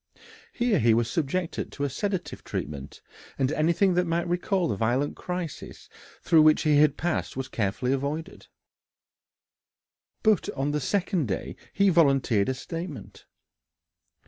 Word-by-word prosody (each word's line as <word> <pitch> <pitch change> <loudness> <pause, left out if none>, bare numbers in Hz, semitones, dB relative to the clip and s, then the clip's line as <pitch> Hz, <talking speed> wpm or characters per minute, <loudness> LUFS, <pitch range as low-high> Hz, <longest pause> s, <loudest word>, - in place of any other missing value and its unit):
Here 240 -4 +1
he 115 -1 +4
was 115 -1 0
subjected 165 +5 -2
to 140 - -4
a 145 - 0
sedative 190 +6 -3
treatment, 70 -1 -6 0.3
and 135 0 +1
anything 170 +5 +2
that 180 0 +1
might 170 +1 0
recall 180 +1 0
the 105 - -1
violent 120 +7 0
crisis 180 -4 -6 0.3
through 165 -2 +5
which 155 0 +5
he 150 -2 +4
had 150 -1 +4
passed 170 -5 -2
was 135 -1 -3
carefully 115 +5 -1
avoided. 150 +6 -4 1.8
But 215 -5 +3
on 140 +2 -1
the 150 0 -1
second 180 - 0
day 95 - -4 0.2
he 200 0 +3
volunteered 135 - +3
a 130 - -1
statement. 165 - -8
150 Hz, 140 wpm, -26 LUFS, 130-175 Hz, 1.8 s, through